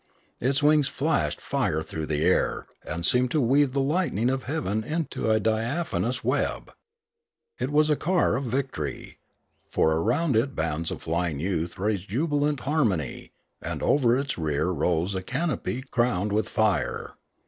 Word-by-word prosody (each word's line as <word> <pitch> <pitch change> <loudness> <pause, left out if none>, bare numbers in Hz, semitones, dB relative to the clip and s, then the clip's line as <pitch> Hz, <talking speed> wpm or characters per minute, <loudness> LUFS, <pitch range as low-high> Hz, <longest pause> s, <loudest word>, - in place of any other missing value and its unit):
Its 135 +4 +1
wings 150 -2 +5
flashed 135 - 0
fire 80 +1 -1
through 80 -1 -5
the 75 0 0
air - - +2 0.2
and 85 +2 -3
seemed 125 +2 +3
to 155 - +1
weave 135 +1 +3
the 140 - +1
lightnings 135 - +1
of 130 -1 -3
heaven 110 -8 -1
into 150 -4 -2
a 110 0 +4
diaphanous 115 - -1
web. - - -1 0.9
It - - -1
was 150 +1 +3
a - - +4
car 180 0 +1
of 135 +2 -2
victory; 125 - -4 0.5
for 80 - +2
around 120 - +1
it 125 +4 +1
bands 80 0 -1
of - - -6
flying 85 -2 -1
youth 85 -1 -2
raised 100 -1 -1
jubilant 145 - 0
harmony, 115 - -1 0.3
and - - -4
over 125 -4 +3
its 140 -7 -3
rear 75 +1 0
rose 90 +1 0
a 95 - -2
canopy 130 - -2
crowned 120 -7 0
with 110 +1 0
fire. 110 -3 0
120 Hz, 155 wpm, -26 LUFS, 90-140 Hz, 0.9 s, wings